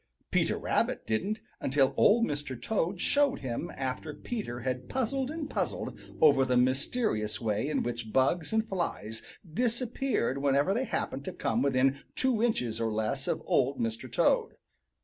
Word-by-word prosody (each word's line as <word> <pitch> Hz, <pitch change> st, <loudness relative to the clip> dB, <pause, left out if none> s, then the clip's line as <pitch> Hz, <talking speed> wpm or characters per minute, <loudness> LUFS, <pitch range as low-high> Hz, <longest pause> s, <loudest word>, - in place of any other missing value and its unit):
Peter -, -, +2 dB
Rabbit -, -, 0 dB
didn't 200 Hz, -, -1 dB, 0.2 s
until 135 Hz, 0 st, +2 dB
Old 230 Hz, +2 st, +5 dB
Mr. 145 Hz, -4 st, -4 dB
Toad 180 Hz, -, -1 dB
showed 285 Hz, +6 st, +2 dB
him 125 Hz, -3 st, -3 dB
after 135 Hz, +3 st, -4 dB
Peter 165 Hz, -, -5 dB
had 125 Hz, 0 st, -3 dB
puzzled 265 Hz, +1 st, -1 dB
and 310 Hz, -1 st, -4 dB
puzzled -, -, -2 dB, 0.2 s
over 145 Hz, -4 st, +6 dB
the 130 Hz, -1 st, +2 dB
mysterious 130 Hz, -, +1 dB
way 110 Hz, +4 st, 0 dB
in 155 Hz, -, 0 dB
which 120 Hz, -2 st, -4 dB
bugs 140 Hz, -, +2 dB
and 220 Hz, 0 st, +1 dB
flies 110 Hz, -, -3 dB, 0.3 s
disappeared 240 Hz, -, 0 dB
whenever 140 Hz, +6 st, +3 dB
they 250 Hz, +5 st, 0 dB
happened 135 Hz, -, -3 dB
to -, -, -3 dB
come 120 Hz, -9 st, -1 dB
within 135 Hz, 0 st, +2 dB, 0.2 s
two 255 Hz, -4 st, +1 dB
inches 125 Hz, -, 0 dB
or 115 Hz, -1 st, 0 dB
less 110 Hz, +5 st, -1 dB
of -, -, -1 dB
Old 135 Hz, +2 st, +2 dB
Mr. 115 Hz, -1 st, -3 dB
Toad. -, -, +2 dB
140 Hz, 155 wpm, -30 LUFS, -, 0.3 s, over